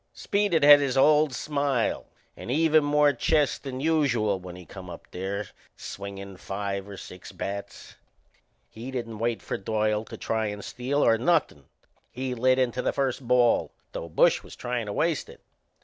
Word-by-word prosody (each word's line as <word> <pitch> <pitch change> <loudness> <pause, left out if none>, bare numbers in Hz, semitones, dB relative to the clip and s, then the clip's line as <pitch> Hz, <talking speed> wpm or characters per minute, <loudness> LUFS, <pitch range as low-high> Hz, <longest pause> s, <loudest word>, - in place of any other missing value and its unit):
Speed 205 -2 0
had 145 -2 +8
his 135 -2 -1
old 150 +1 +5
smile 140 -2 -1 0.3
and - - -9
even 155 +2 +4
more 145 0 +4
chest 145 +3 +1
than 130 -2 -6
usual 130 -10 +1
when 90 -1 -9
he 90 -1 -11
come 90 +3 -10
up 85 - -9
there, 95 +2 -4 0.3
swingin' 100 -1 -8
five 100 +1 -4
or 100 - -8
six 90 -1 -10
bats. 100 0 -7 0.7
He 115 +4 -9
didn't 115 -4 -5
wait 115 0 -1
for - - -3
Doyle 105 +1 0
to - - -9
try 110 -1 -1
and 105 -1 -6
steal, 135 +4 -1
or 115 -1 +4
nothin'. 135 - +1 0.4
He 130 0 -4
lit 130 +2 +3
into 125 -1 0
the - - 0
first 135 -2 -2
ball, 125 -1 +3 0.2
though 85 - -6
Bush 80 - +3
was - - -12
tryin' 120 -2 -3
to 100 - -3
waste 160 +3 0
it. - - -14
120 Hz, 170 wpm, -26 LUFS, 100-145 Hz, 0.7 s, had